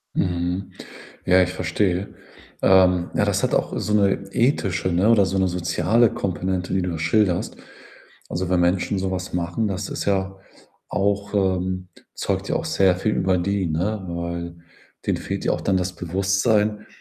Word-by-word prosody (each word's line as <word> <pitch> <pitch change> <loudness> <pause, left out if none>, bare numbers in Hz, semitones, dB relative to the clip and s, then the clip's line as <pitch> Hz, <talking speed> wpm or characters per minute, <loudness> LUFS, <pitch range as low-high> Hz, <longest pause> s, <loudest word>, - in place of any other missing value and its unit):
Mhm. 90 +2 -1 0.5
Ja, 95 0 +5
ich 90 0 0
verstehe. 90 +3 -1 0.5
Ähm, 90 -2 +4
ja, - - +2
das - - 0
hat - - +1
auch - - 0
so 105 - -1
'ne 100 -1 +2
ethische, 95 - +1
ne, 90 +5 +2
oder 105 -4 +5
so 95 +1 -1
'ne 95 - +3
soziale 90 +6 +2
Komponente, 90 0 -2
die 95 -1 +1
du 90 - -2
da 80 - -4
schilderst. 90 +1 +1 0.7
Also, 90 +1 -3
wenn 90 -1 +2
Menschen 90 +2 +1
so 95 0 -2
was 90 -1 -4
machen, 90 +5 -1
das 95 +1 -3
ist - - -4
ja 95 -1 0 0.5
auch 100 0 -1
ähm, 95 -1 0 0.3
zeugt - - -2
ja - - +1
auch - - -3
sehr 95 -2 +3
viel 105 +3 -1
über 95 -1 +1
die, 100 +1 0
ne? 95 +6 -2
Weil 85 0 -4 0.5
denen - - +1
fehlt - - -4
ja - - +2
auch - - -2
dann 95 -1 +1
das 90 0 -1
Bewusstsein, 100 +4 0
95 Hz, 175 wpm, -23 LUFS, 90-100 Hz, 0.7 s, Ja